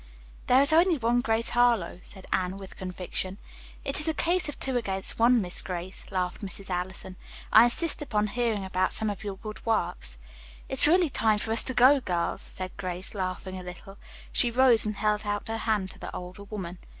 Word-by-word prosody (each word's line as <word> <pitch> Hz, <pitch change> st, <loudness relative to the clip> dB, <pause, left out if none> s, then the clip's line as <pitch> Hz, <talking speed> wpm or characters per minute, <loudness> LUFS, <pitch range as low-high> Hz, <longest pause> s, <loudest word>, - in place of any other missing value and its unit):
"There 255 Hz, +2 st, +5 dB
is 280 Hz, +2 st, +8 dB
only 340 Hz, +1 st, +4 dB
one 240 Hz, 0 st, +1 dB
Grace 230 Hz, -2 st, 0 dB
Harlowe," 235 Hz, -8 st, +2 dB
said 190 Hz, 0 st, -12 dB
Anne, 185 Hz, +1 st, -1 dB
with 195 Hz, -1 st, -11 dB
conviction. 185 Hz, +1 st, -4 dB, 0.5 s
"It 275 Hz, -, 0 dB
is 300 Hz, -, 0 dB
a 320 Hz, -, 0 dB
case 355 Hz, 0 st, +1 dB
of 295 Hz, -, -7 dB
two 265 Hz, -1 st, 0 dB
against 195 Hz, -5 st, -3 dB
one, 240 Hz, +1 st, +5 dB
Miss 180 Hz, -1 st, 0 dB
Grace," 180 Hz, 0 st, -6 dB
laughed 180 Hz, -1 st, -2 dB
Mrs. 195 Hz, -1 st, -7 dB
Allison. 185 Hz, +1 st, -4 dB, 0.4 s
"I 220 Hz, +2 st, +9 dB
insist 300 Hz, +8 st, +1 dB
upon 210 Hz, -7 st, 0 dB
hearing 220 Hz, -2 st, -1 dB
about 185 Hz, 0 st, 0 dB
some 220 Hz, -1 st, 0 dB
of 200 Hz, 0 st, -8 dB
your 200 Hz, -2 st, -5 dB
good 215 Hz, +1 st, -9 dB
works." -, -, -1 dB, 0.5 s
"It's 265 Hz, +2 st, +6 dB
really 345 Hz, 0 st, +4 dB
time 220 Hz, -4 st, +2 dB
for 220 Hz, +1 st, -3 dB
us 225 Hz, -, +5 dB
to 260 Hz, -, -2 dB
go, 265 Hz, +3 st, +6 dB
girls," 175 Hz, -8 st, -2 dB
said 185 Hz, -1 st, -6 dB
Grace, 180 Hz, 0 st, -5 dB
laughing 185 Hz, -1 st, -4 dB
a -, -, -9 dB
little. 185 Hz, +2 st, -10 dB, 0.3 s
She 245 Hz, -, +3 dB
rose 240 Hz, -2 st, +4 dB
and 210 Hz, -, -3 dB
held 210 Hz, +1 st, 0 dB
out 205 Hz, -1 st, -3 dB
her 225 Hz, -, -2 dB
hand 205 Hz, -4 st, 0 dB
to -, -, -11 dB
the -, -, -7 dB
older 180 Hz, +3 st, -8 dB
woman. 185 Hz, -4 st, -7 dB
210 Hz, 200 wpm, -27 LUFS, 185-245 Hz, 0.5 s, I